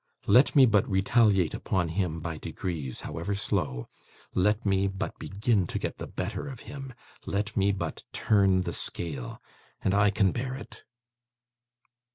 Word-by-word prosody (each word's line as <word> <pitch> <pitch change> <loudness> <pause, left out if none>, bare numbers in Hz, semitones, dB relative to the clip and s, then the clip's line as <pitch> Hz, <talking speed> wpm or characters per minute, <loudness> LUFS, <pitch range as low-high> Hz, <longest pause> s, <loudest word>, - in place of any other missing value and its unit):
Let 125 +10 +5
me 135 -2 +9
but 105 -4 +3
retaliate 95 -2 +3
upon 90 -3 -1
him, 85 -2 -1
by 80 -1 -4
degrees, 75 -8 -4
however 100 0 -3
slow 65 -9 -2 0.5
let 105 +4 +2
me 95 -1 +2
but 95 +3 -4
begin 100 -2 0
to - - -3
get - - -4
the - - -5
better - - -4
of 130 -4 -8
him, 135 0 -8 0.3
let 105 +2 -2
me 100 0 +3
but 100 - -4
turn 95 -3 +3
the - - -3
scale 70 -8 -4 0.4
and 95 - 0
I 100 +1 +5
can 100 -2 +2
bear 130 +2 -3
it. 135 - -11
100 Hz, 155 wpm, -28 LUFS, 90-110 Hz, 0.5 s, me